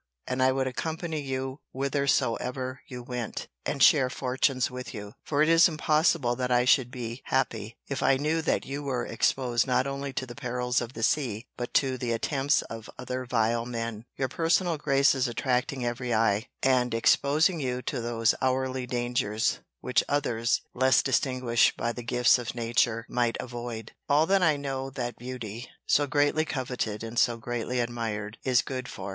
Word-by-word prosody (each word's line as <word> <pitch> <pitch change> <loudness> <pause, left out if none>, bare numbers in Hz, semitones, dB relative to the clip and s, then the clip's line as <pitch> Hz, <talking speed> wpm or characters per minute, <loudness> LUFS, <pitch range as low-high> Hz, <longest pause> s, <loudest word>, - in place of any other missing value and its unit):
And 130 0 -2
I 130 0 +5
would 130 0 0
accompany 160 +4 -3
you 135 0 -4
whithersoever 130 -1 0
you 125 -2 -7
went, 125 -3 -5 0.2
and 140 -3 +1
share 135 -4 +6
fortunes 130 0 0
with 125 0 -7
you: 105 0 -7
for 150 0 +2
it - - +2
is 165 +1 +7
impossible 155 -5 +2
that 125 -1 -1
I 125 0 +3
should 125 -1 +4
be 120 -1 -6
happy, 115 -4 -1
if 140 - -3
I 135 0 +4
knew 155 +4 0
that 160 - 0
you 140 +1 -4
were 130 -4 -2
exposed 120 +1 +1
not 125 0 +2
only 140 0 -3
to 130 - -2
the 120 - -9
perils 125 -1 -1
of 120 +1 -6
the 115 - -5
sea, 120 -5 0
but 120 -1 -6
to 130 -2 +2
the 120 -1 -1
attempts 135 +4 +1
of 115 -1 -9
other 130 +1 -4
vile 115 -1 +1
men; 115 -2 -4
your 135 - 0
personal 165 +4 +1
graces 135 -2 +3
attracting 125 +1 -1
every 120 0 -1
eye; 110 +1 +2 0.2
and 125 -3 +3
exposing 150 +8 +3
you 125 -2 -2
to 130 -5 -3
those 115 -1 +1
hourly 130 -1 0
dangers, 120 -3 0 0.2
which - - +2
others, 120 -5 +1
less 130 +1 +4
distinguished 130 -3 +2
by 120 - -1
the 120 - -6
gifts 125 +1 +3
of 120 -1 -5
nature, 115 -1 +1
might 120 -1 0
avoid.—All 120 +5 -2
that 195 +2 +3
I 155 -4 +4
know 135 -1 -3
that 125 -3 -4
beauty 120 -2 -6 0.2
(so 145 0 +3
greatly 145 +2 +2
coveted, 125 -7 -3
and 115 +1 -2
so 120 -2 +3
greatly 120 +1 -3
admired) 115 -2 -3
is 125 -2 +3
good 130 -1 -5
for. 95 +1 -7
125 Hz, 175 wpm, -28 LUFS, 120-135 Hz, 0.2 s, is